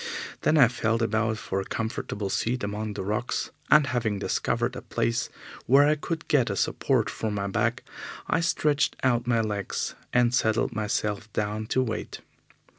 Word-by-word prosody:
Then 155 - +3
I 135 -5 +8
felt 115 -1 0
about 110 0 +1
for 95 -3 -2
a - - -4
comfortable 105 -2 -3
seat 125 +4 -1
among 105 +1 -3
the - - -4
rocks, 105 +5 -2 0.2
and, 150 -1 +7
having 120 -5 -1
discovered 120 +4 -1
a - - -6
place 115 0 -1 0.4
where 140 +4 +6
I 150 - +5
could 160 +2 -4
get 130 -7 +3
a 100 - -1
support 120 +1 +1
for 110 +1 -3
my 100 -1 -2
back, 110 +4 0 0.4
I - - +2
stretched 155 -3 +1
out 120 -2 +2
my 115 -2 +3
legs 105 -3 -2 0.2
and 120 0 +3
settled 110 0 +2
myself 105 0 -2
down 105 +1 -2
to 130 +2 +2
wait. 115 -3 -5
115 Hz, 170 wpm, -27 LUFS, 105-125 Hz, 0.4 s, I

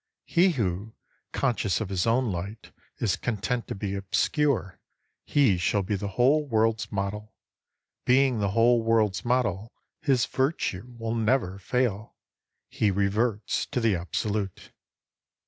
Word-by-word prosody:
He 180 +1 +3
who, 105 - -2 0.4
conscious 110 -9 0
of 110 - -4
his 95 +1 0
own 120 0 +2
light, 95 +5 -6 0.3
is 105 -5 +1
content 120 +2 -2
to - - -4
be 100 0 -4
obscure, 100 - 0 0.2
— - - -50
he 130 -11 +4
shall 100 +3 +1
be 105 +3 -1
the 100 +1 -3
whole 140 +5 +4
world's 115 -4 0
model. 105 +1 -4 0.7
Being 130 -2 +3
the 100 -1 +1
whole 115 +3 +4
world's 110 -3 +1
model, 115 -4 0 0.3
his 135 -5 +2
Virtue 125 - -2
will 115 0 -3
never 115 -4 0
fail. 110 0 -1 0.5
He 105 - 0
reverts 100 +2 0
to - - -2
the 115 -4 +2
Absolute. 100 +3 -3
110 Hz, 135 wpm, -27 LUFS, 100-125 Hz, 0.7 s, he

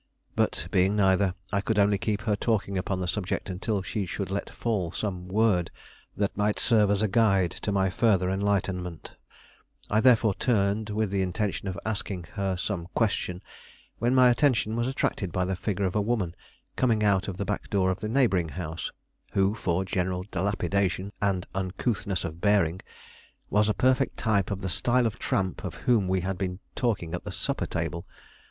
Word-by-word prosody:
But - - 0
being 95 +3 +3
neither, 95 -2 +3 0.2
I 100 - +2
could 110 +1 -1
only 100 -1 +4
keep 105 -1 -1
her 105 -1 +1
talking 100 -2 0
upon 95 0 -1
the 90 - -2
subject 95 +1 -2
until 100 +2 -2
she 95 0 -3
should 95 +1 -4
let 100 - -2
fall 100 -8 -2
some 90 -1 -4
word 95 -3 +2 0.5
that 100 -1 0
might 105 +1 +1
serve 105 -3 +4
as 100 +1 +2
a - - +3
guide 95 -4 +3
to 105 - -1
my 95 -2 +2
further 95 -5 +3
enlightenment; 95 -3 -1 0.8
I 105 - +4
therefore 115 -4 +5
turned, 105 -1 +1
with 105 -1 -1
the 100 -1 +1
intention 95 +2 -2
of 95 -1 -3
asking 100 -4 -3
her 95 -3 -1
some 90 -2 -3
question, 95 -5 0 0.6
when 120 +3 +2
my 125 -1 +7
attention 120 -4 +2
was 120 +1 0
attracted 110 -8 -1
by 90 +2 0
the 95 +1 -1
figure 100 +1 -1
of 90 - -1
a 105 - +3
woman 100 -6 0 0.4
coming 115 -4 +2
out 100 -2 +2
of 95 -3 -4
the 100 - -2
back 105 - -3
door 95 -2 +2
of 95 - -3
the 105 - -2
neighboring 110 -10 +2
house, 80 -1 -5 0.4
who, 95 +1 +3
for 95 -4 -1
general 90 0 -1
dilapidation 100 +1 0
and 95 -3 +1
uncouthness 95 +1 -2
of 85 0 -6
bearing, 95 -4 +2 0.7
was 105 +1 +3
a 105 - +1
perfect 130 +3 +2
type 100 -5 +1
of 100 -1 -3
the 95 - -2
style 120 +9 +2
of 115 0 -2
tramp 95 -3 -1
of - - -5
whom 115 -6 +2
we 95 0 +1
had 95 0 -3
been 90 -1 -2 0.2
talking 100 -9 -1
at 90 - -3
the - - -6
supper - - -2
table. 85 0 -3
100 Hz, 185 wpm, -27 LUFS, 90-105 Hz, 0.8 s, my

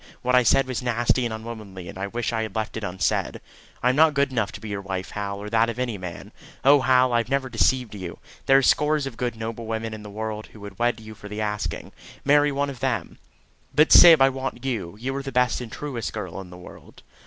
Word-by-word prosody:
"What 125 0 +1
I 125 - +6
said 125 +3 +4
was 130 -1 -3
nasty 120 +1 +1
and 120 - -2
unwomanly, 110 -5 -8
and - - -9
I 95 +1 -4
wish 120 +3 -3
I 110 - 0
had 110 -3 -5
left 110 -1 -3
it 110 - -5
unsaid. 95 -1 -1 0.4
I 125 - +4
am 130 - +2
not 155 -1 +5
good 140 -1 +2
enough 115 -5 -1
to 110 - -7
be 110 0 -8
your 100 -1 -3
wife, 95 -1 -5
Hal, 100 -1 -4
or 100 +1 -7
that 115 0 +3
of 115 - -5
any 125 -3 -2
man. 90 -2 -8 0.3
Oh, 140 0 +7
Hal, 130 -1 +3
I 120 - +4
have 115 0 -3
never 135 -1 0
deceived 125 0 +1
you! 90 -4 -7 0.3
There 135 - +7
are 135 - +3
scores 150 +1 +3
of 135 -4 -6
good 120 -1 -3
noble 115 0 -6
women 110 0 -3
in 110 - -7
the 105 - -9
world 110 +1 -5
who 110 - -16
would 100 -2 -10
wed 120 0 +1
you 110 0 -10
for 105 -1 -11
the 105 +1 -6
asking 105 -1 -3 0.3
marry 145 +1 +4
one 140 0 -1
of 130 - -11
them." 120 -10 -2 0.6
"But, 150 +1 +5
Syb, 165 -5 +9
I 135 - +6
want 135 0 -5
you. 105 -8 -3
You 135 +3 -3
are - - -2
the 135 0 -6
best 125 -1 +1
and 115 -3 -8
truest 130 -7 -5
girl 95 -3 -5
in 90 - -12
the 90 - -11
world." 90 - -14
115 Hz, 255 wpm, -24 LUFS, 105-130 Hz, 0.6 s, Syb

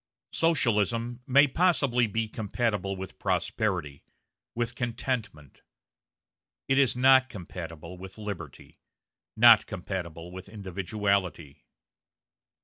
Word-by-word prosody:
Socialism 120 - +1
may 140 +3 +6
possibly 140 -7 +2
be 110 +2 -2
compatible 105 -3 -2
with 95 0 -8
prosperity, 90 -5 -1 0.5
with 120 +1 -1
contentment; 115 - -4 1.1
it 135 +1 +3
is 135 -4 +3
not 130 +1 +5
compatible 90 - -8
with 95 +2 -10
liberty, 105 -3 -8 0.6
not 115 0 +7
compatible 85 -2 -6
with 95 +2 -10
individuality. 100 -6 -2
105 Hz, 90 wpm, -28 LUFS, 90-120 Hz, 1.1 s, not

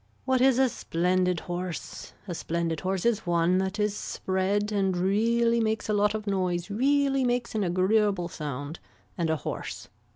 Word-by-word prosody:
What 260 -1 +2
is 260 -1 +5
a 265 0 +5
splendid 180 -4 0
horse. 175 -1 -6
A 175 - -3
splendid 165 -1 -2
horse 190 +1 -2
is 225 -4 +1
one 175 +1 +3
that 190 +1 -2
is 210 -1 +1
spread 200 +2 -1
and 195 -3 +1
really 230 +5 +2
makes 220 -1 0
a - - +2
lot 205 +1 +2
of 215 -1 -4
noise 185 -2 -1
really 275 +4 +2
makes 245 -1 0
an 215 -2 0
agreeable 190 +1 +2
sound 145 -1 -6 0.4
and 170 -2 -1
a 160 - +2
hoarse. 150 - -6
195 Hz, 165 wpm, -27 LUFS, 175-220 Hz, 0.4 s, is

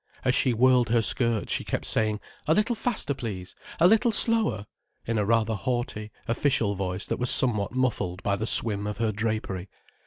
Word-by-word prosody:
As 125 - +3
she 130 - +3
whirled 125 0 +3
her 115 -1 +2
skirts 115 -1 0
she - - -1
kept - - -4
saying: 110 -1 0 0.3
"A 160 - +3
little 215 +3 +1
faster, 220 - -2
please"—"A 115 - -2
little 225 +4 +3
slower"—in 205 - -1
a 105 - 0
rather 115 0 +1
haughty, 120 -1 -3 0.2
official 115 -3 +1
voice 95 -1 -3
that - - -3
was 125 0 0
somewhat 110 -6 +2
muffled 100 -8 -1
by 100 - +1
the 110 +2 -3
swim 105 -3 +3
of 105 -1 -4
her 115 -1 0
drapery. 105 -3 -3
115 Hz, 175 wpm, -26 LUFS, 105-130 Hz, 0.3 s, As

